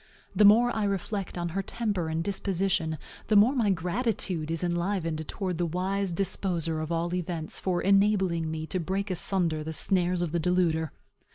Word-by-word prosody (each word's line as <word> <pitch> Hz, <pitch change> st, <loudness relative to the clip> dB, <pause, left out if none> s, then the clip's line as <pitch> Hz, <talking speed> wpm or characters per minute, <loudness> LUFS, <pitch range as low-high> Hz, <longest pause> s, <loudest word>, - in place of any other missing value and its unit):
The 210 Hz, -, +5 dB
more 235 Hz, +4 st, +6 dB
I 215 Hz, -2 st, 0 dB
reflect 195 Hz, -1 st, -3 dB
on 170 Hz, 0 st, -2 dB
her 195 Hz, +4 st, -2 dB
temper 200 Hz, -5 st, -2 dB
and 160 Hz, +1 st, -1 dB
disposition, 190 Hz, -4 st, -1 dB, 0.3 s
the 215 Hz, -, +2 dB
more 215 Hz, +6 st, +6 dB
my 235 Hz, -6 st, +1 dB
gratitude 180 Hz, -2 st, -1 dB
is 165 Hz, +1 st, -1 dB
enlivened 170 Hz, -3 st, -1 dB
towards 185 Hz, -5 st, -3 dB
the 175 Hz, -, +1 dB
wise 190 Hz, +3 st, -1 dB
Disposer 170 Hz, -3 st, -1 dB
of 155 Hz, +1 st, -4 dB
all 170 Hz, +1 st, -1 dB
events 170 Hz, -3 st, -3 dB
for 180 Hz, -2 st, -1 dB
enabling 195 Hz, -4 st, +3 dB
me 160 Hz, 0 st, -4 dB
to 185 Hz, -, -3 dB
break 190 Hz, +4 st, -2 dB
asunder 170 Hz, -3 st, 0 dB
the 160 Hz, +1 st, -4 dB
snares 180 Hz, 0 st, +1 dB
of 170 Hz, -, -3 dB
the 170 Hz, -, 0 dB
deluder. 165 Hz, -2 st, +1 dB
180 Hz, 175 wpm, -28 LUFS, 165-195 Hz, 0.3 s, more